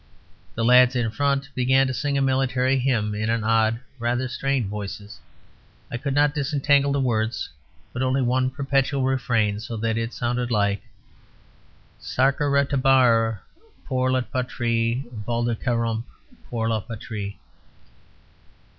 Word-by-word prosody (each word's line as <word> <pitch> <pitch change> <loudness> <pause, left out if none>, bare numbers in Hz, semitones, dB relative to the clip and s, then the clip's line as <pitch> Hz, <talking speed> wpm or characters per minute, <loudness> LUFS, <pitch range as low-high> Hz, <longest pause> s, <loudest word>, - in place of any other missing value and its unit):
The 115 - 0
lads 125 +1 +6
in 120 -3 0
front 140 +2 0
began 130 +1 +3
to 130 - -2
sing 140 +4 -1
a 135 - +2
military 130 0 +1
hymn 115 -5 0
in 110 +1 -2
odd, 110 0 +2 0.2
rather 120 +2 0
strained 135 -1 -1
voices; 105 +1 -7 0.7
I 120 - -2
could 135 +2 -3
not 145 0 +3
disentangle 140 -1 +2
the 140 - +1
words, 115 -3 -1 0.4
but 125 - -3
only 130 +1 +1
one 130 +1 +1
perpetual 135 0 0
refrain; 115 -6 +1
so 115 +1 -6
that 115 +1 -1
it 115 +1 -3
sounded 120 0 -2
like 100 -3 +1 1.2
Sacrarterumbrrar 135 -5 +2 0.4
pour 130 -1 0
la 130 0 +2
patrie, 120 0 -1
Valdarkararump 115 +1 -1 0.5
pour 115 -2 -1
la 115 -1 +1
patrie. 105 -2 -6
125 Hz, 125 wpm, -24 LUFS, 115-135 Hz, 1.2 s, lads